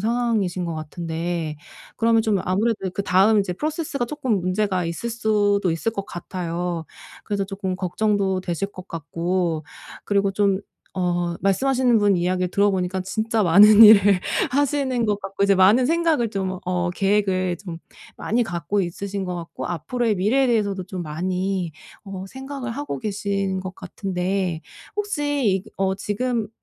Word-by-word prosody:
상황이신 220 -5 0
것 170 -1 -3
같은데 160 0 -4 0.4
그러면 225 0 +3
좀 215 -3 +1
아무래도 200 +1 0
그다음 195 +3 +3
이제 195 -2 -2
프로세스가 295 - -2
쪼끔 250 -7 -1
문제가 185 0 0
있을 170 +8 -3
수도 205 -4 +1
있을 165 +8 -1
것 200 -3 -4
같아요. 175 -1 -4 0.4
그래서 200 -2 -1
조금 195 -1 -4
걱정도 190 0 0
되실 185 +2 -3
것 185 +1 -11
같고 165 +1 -2 0.4
그리고 200 -1 +1
좀 195 -1 +2 0.3
어 175 -2 -1
말씀하시는 250 +4 +2
분 205 -2 +3
이야기를 180 +1 0
들어 200 +1 +3
보니까 185 0 -1
진짜 220 +3 0
많은 210 +5 +8
일을 205 -3 +7 0.3
하시는 265 -3 +1
것 205 -1 0
같고 195 0 -1
이제 200 0 +4
많은 205 +7 +5
생각을 320 -7 +1
좀 190 -2 -3
어 180 -1 0
계획을 190 -2 +1
좀 175 -4 -8 0.4
많이 240 +3 0
갖고 175 0 -2
있으신 195 +2 -4
것 180 -1 -4
같고 170 -1 -6
앞으로의 215 - -1
미래에 245 +8 +2
대해서도 200 -5 0
좀 185 -1 -6
많이 180 +3 -2 0.3
어 195 -2 -7
생각을 265 +2 -6
하고 290 +4 -4
계신 200 -3 -2
것 185 0 -6
같은데 185 -3 -3 0.3
혹시 290 - 0
어 190 0 +1
지금 220 +3 -2
195 Hz, 315 characters per minute, -23 LUFS, 180-220 Hz, 0.4 s, 많은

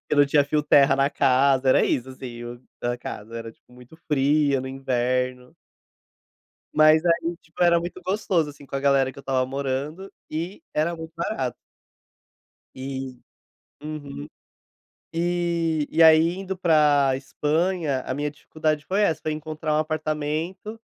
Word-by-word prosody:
que - - +1
não 145 0 +6
tinha 145 0 +3
fio 150 +1 0
terra 140 -2 +5
na 135 0 +3
casa, 135 -1 +3
era - - +4
isso, 130 +1 -1
assim, 120 -2 -8
o 120 +1 -9 0.2
a 120 0 -1
casa 115 -1 -8
era 115 0 -6
tipo 115 - -26
muito 125 +5 -15
fria 145 -1 +2
no 130 - -6
inverno 125 -1 -2 1.2
Mas 155 +1 +6
aí, 170 0 +1
tipo, 165 +2 -5
era 170 -1 +5
muito 175 +2 -6
gostoso, 185 -5 0
assim, 145 -1 -15
com - - -10
a - - -2
galera 135 -1 +3
que - - -14
eu - - -7
estava 130 -2 0
morando, 140 +7 -4 0.2
e 170 - -5
era 160 +3 +1
muito 160 0 -9
barato. 150 - -2 1.2
E, 130 -1 -5 0.7
uhum. 145 - -7 0.9
E 170 -2 0
e 165 - +2
aí, 160 +1 +7
indo 190 0 -5
pra 150 -5 +4
Espanha, 150 +2 -1
a - - -2
minha 145 +2 -2
dificuldade 155 0 -2
foi 195 +3 +1
essa 160 -6 +1
pra 155 - -2
encontrar 155 0 -3
um - - +2
apartamento, 155 +7 -3
150 Hz, 155 wpm, -24 LUFS, 135-165 Hz, 1.2 s, aí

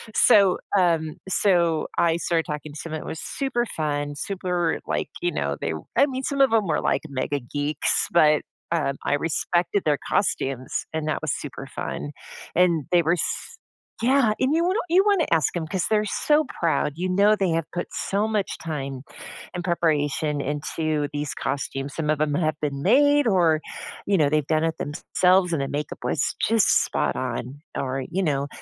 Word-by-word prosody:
so, 195 -3 +5 0.2
um 165 -4 +2
so 170 -5 +2
I 170 -1 +3
started 170 -1 0
talking 150 0 -5
to - - -9
someone, 160 -1 -5
it - - -10
was 160 - -5
super 265 -4 -1
fun, 145 -2 -1
super 180 0 -1
like, - - -1
you 175 0 +1
know, 70 0 -1
they 80 - -1
r 80 - -6 0.2
I - - +7
mean, 265 0 -4
some 280 +1 0
of 270 - +5
them 220 -3 +2
were, 160 - +1
like, - - 0
mega-geeks, 145 +2 -1
but, 155 -3 +5 0.3
um, 140 -4 0
I - - +1
respected 175 +5 0
their 145 -2 +2
costumes, 135 -9 -1
and 155 -1 -2
that 155 - -1
was 155 -4 -1
super 140 -1 -6
fun, 145 - -4 0.4
and 170 -5 +3
they 175 -1 +5
were 165 +2 +3
s 175 - -3 0.5
yeah, 250 -3 +4
and 265 +4 +2
you 335 +1 +2
wan 370 +2 +1
you 365 +3 +5
wanna 400 -6 +3
ask 165 +1 +2
'em, 165 -2 -2
'cause 185 +1 -1
they're 215 -1 +2
so 300 +9 +2 0.2
proud, 165 -3 +1
you 180 +2 -2
know 200 +3 +4
they 190 -4 0
have 165 -1 0
put 175 - -2
so 205 +2 -1
much 210 -3 -1
time 135 -5 -5 0.5
and 175 -1 -4
preparation 150 -3 0
into 150 +1 -2
these 145 -1 -2
costumes, 140 0 -3
some 155 -2 0
of 155 - +1
them 150 -1 0
have 155 -1 0
been 140 -2 -2
made, 285 - +4
or 170 -7 +3 0.5
you 195 -2 +2
know, 150 - +4
they've 150 -1 +1
done 155 0 +1
it 165 0 0
thems 145 +3 -5
selves, 180 -1 +4
and 140 - -1
the - - -1
makeup 150 +1 -4
was 145 - 0
just 225 -3 +4
spot - - -1
on 130 +2 -4 0.2
or 135 0 -2
you 190 +3 0
know, 140 -3 0
165 Hz, 190 wpm, -24 LUFS, 145-190 Hz, 0.5 s, I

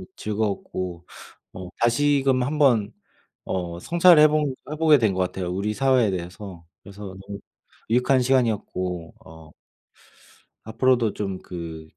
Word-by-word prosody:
즐거웠고 100 -4 -4 0.5
어 90 -1 -8
다시금 135 +1 +2
한 150 +4 -2
번 115 -8 +3 0.5
어 85 -2 -4
성찰을 170 - +5
해 155 - +7
본 150 -3 0 0.2
해 155 - -4
보게 155 -2 +5
된 110 -5 +1
것 95 - -2
같아요 90 0 -2
우리 100 +3 -2
사회에 130 -3 +2
대해서. 90 -1 -7 0.2
그래서 100 0 -12 0.2
너무 100 +1 -8 0.5
유익한 125 +2 +3
시간이었고 105 -9 -1
어 80 -1 -14 1.1
앞으로도 120 0 +1
좀 95 -3 -4
그 80 -3 -8
105 Hz, 260 characters per minute, -23 LUFS, 90-130 Hz, 1.1 s, 해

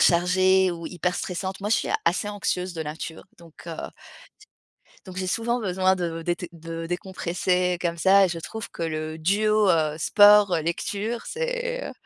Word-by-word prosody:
chargées 185 +2 +4
ou 170 -1 -6
hyper 180 +1 -2
stressantes. 190 +1 -4
Moi, 205 - -3
je 225 - +4
suis - - -2 0.2
assez 180 +4 +1
anxieuse 185 -3 -2
de 165 -2 -4
nature, 160 +1 -7
donc, 170 0 -16
heu 165 -1 -6 1.2
donc 185 -1 -10
j'ai 185 0 -2
souvent 235 +5 -1
besoin 190 -1 +2
de 165 -2 -3
dété 175 +1 -3
de 165 0 -7
décompresser 180 0 -1
comme 170 -1 -1
ça. 195 +3 +5
Je 175 -2 -4
trouve 220 +7 -7
que - - -7
le 155 -1 -3
duo, 210 +4 +2
heu, 155 -3 +1
sport, 205 +1 +6
lecture, 205 +7 -3
c'est, - - -3
heu, - - -7
180 Hz, 165 wpm, -25 LUFS, 170-200 Hz, 1.2 s, sport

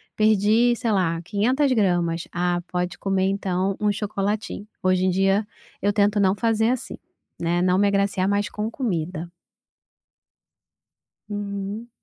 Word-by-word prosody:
perdi 215 +3 +3
sei 235 -1 -1
lá 175 -5 +1
500 255 - +1
gramas, 175 -6 +1
ah, 175 0 0
pode 180 0 -2
comer, 195 -1 0
então, 195 -1 -1
um 210 - +3
chocolatinho." 205 0 -3 0.2
Hoje 185 0 +2
em 185 - +3
dia 195 +3 +2 0.4
eu 205 - +2
tento 205 0 +2
não 195 0 +3
fazer 225 0 +1
assim, 255 - -4 0.4
né, 170 +1 +1
não 180 0 +3
me 205 - +4
agraciar 200 -1 +1
mais 205 0 +1
com 210 +4 -3
comida. 175 - -3 2.0
Uhum. 205 +2 -5
200 Hz, 135 wpm, -23 LUFS, 185-210 Hz, 2.0 s, me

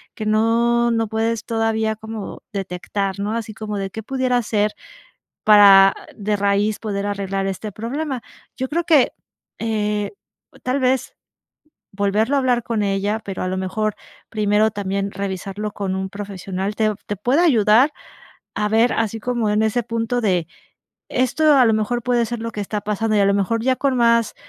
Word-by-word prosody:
que 215 - -5
no 230 +2 +2
no 225 -1 +1
puedes 225 +1 -1
todavía 220 -1 0
como 220 -1 -7
detectar, 195 0 -3
¿no? 205 +2 -2
Así 220 -1 -5
como 210 -1 -5
de 195 -1 -3
qué 220 - -6
pudiera 255 +1 0
ser 210 -1 0 0.7
para 195 -2 +8 0.2
de 210 0 -1
raíz 200 +1 +1
poder 200 -2 -3
arreglar 195 -1 -2
este 200 +2 -5
problema. 255 +5 -4 0.3
Yo 260 - -3
creo 340 +4 -1
que, 310 -6 +4 0.5
eh, 210 -2 -1 0.5
tal 255 +2 0
vez 260 -1 0 0.8
volverlo 205 +6 +1
a - - +3
hablar 250 -3 +1
con 220 -2 -1
ella, 200 +2 0
pero 195 -3 -5
a - - -1
lo 185 - -2
mejor 210 +3 -2 0.3
primero 215 0 +2
también 200 0 -2
revisarlo 195 +2 -4
con 195 -2 -3
un 190 0 -3
profesional, 200 0 -5
te 215 0 +2 0.2
te 205 - -2
puede 245 - +1
ayudar 245 - +4 0.6
a 210 0 0
ver 225 +3 +3
así 225 0 -1
como 235 -2 -1
en 210 +1 +2
ese 220 +3 +1
punto 230 +1 -2
de, 180 -7 +1 0.6
esto 285 +4 +3
a 260 - +6
lo 225 - +4
mejor 220 +3 -1
puede 240 -1 +1
ser 240 0 -4
lo 230 0 -4
que 210 - -5
está 205 +1 -3
pasando, 215 +1 0
y - - +4
a - - +4
lo 200 - +3
mejor 210 +3 0
ya 260 +1 +2
con 270 -1 0
más, 235 -2 +3
215 Hz, 175 wpm, -21 LUFS, 200-235 Hz, 0.8 s, para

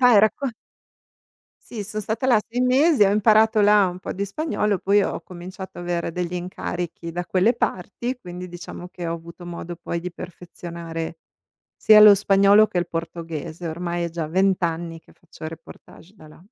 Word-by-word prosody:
Vai, 245 -4 +7
racco 255 +6 +1 1.2
Sì, 215 -4 -5
sò 215 +1 -5
stata 220 +5 -2
là 235 -5 +4
6 245 +2 -1
mesi, 265 -1 +4
ho 195 - +3
imparato 215 +1 +4
là 205 -2 +5
un 180 +1 -7
po' - - -6
di 200 +2 -2
spagnolo, 210 - -1
poi 200 +1 +3
ho - - -2
cominciato 185 +2 -10
a 175 - -6
avere 175 -1 -2
degli 180 0 -3
incarichi 175 -1 -5
da 175 0 -4
quelle 190 +6 +3
parti, 240 +4 -3
quindi 180 -2 -8
diciamo 175 0 -9
che 175 -2 -7
ho 165 - -2
avuto 170 +1 -9
modo 175 0 -7
poi 170 0 -4
di 180 +1 -5
perfezionare 170 -2 -7 0.6
sia 215 -1 +7
lo 210 -1 +10
spagnolo 200 +1 +5
che 180 - -2
il 175 -1 -1
portoghese. 165 0 -5
Ormai 170 +1 -3
è - - -2
già 165 -2 -4
20 190 +2 +2
anni 165 0 -2
che - - -22
faccio 165 -1 -11
reportage 165 +3 -13
da 160 -7 -16
là. 155 - -17
180 Hz, 180 wpm, -23 LUFS, 170-210 Hz, 1.2 s, lo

